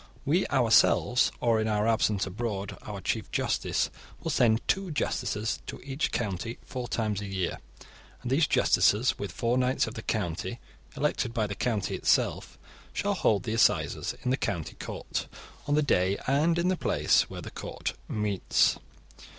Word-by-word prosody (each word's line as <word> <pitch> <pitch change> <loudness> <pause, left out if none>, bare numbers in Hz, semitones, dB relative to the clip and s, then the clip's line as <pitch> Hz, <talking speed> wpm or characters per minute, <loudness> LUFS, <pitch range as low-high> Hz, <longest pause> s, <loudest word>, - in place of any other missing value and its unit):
We 165 +7 +2
ourselves, 125 0 +4
or 115 -2 +3
in 110 - 0
our 105 0 +1
absence 110 -3 +2
abroad 100 0 -4
our - - -7
chief - - -2
justice, - - 0 0.3
will - - -3
send 115 -2 +3
two 195 -1 +1
justices 115 -7 -1
to - - -6
each 135 +2 -2
county 110 +1 -3
four 125 -2 -5
times 105 -4 -1
a 100 - -5
year, 95 -2 -2 0.6
and 125 - -3
these 150 +3 +4
justices, 110 +5 +3
with 100 - -4
four 120 +2 0
knights 130 +1 +2
of 110 - -6
the 110 - -6
county 105 +3 -2 0.4
elected 135 -5 0
by 110 -2 +1
the 100 - -4
county 115 -2 -1
itself, - - +1 0.4
shall 205 0 0
hold 105 - +2
the 110 - -2
assizes 115 - +2
in 125 - 0
the 130 - +2
county 85 - -3
court, - - -4 0.4
on 145 - +2
the 150 - +3
day 95 -7 +2
and 155 +5 +2
in 175 +1 +2
the 185 - +2
place - - +2
where - - -7
the - - -8
court - - -5
meets. 105 -3 +1
115 Hz, 165 wpm, -28 LUFS, 105-130 Hz, 0.6 s, ourselves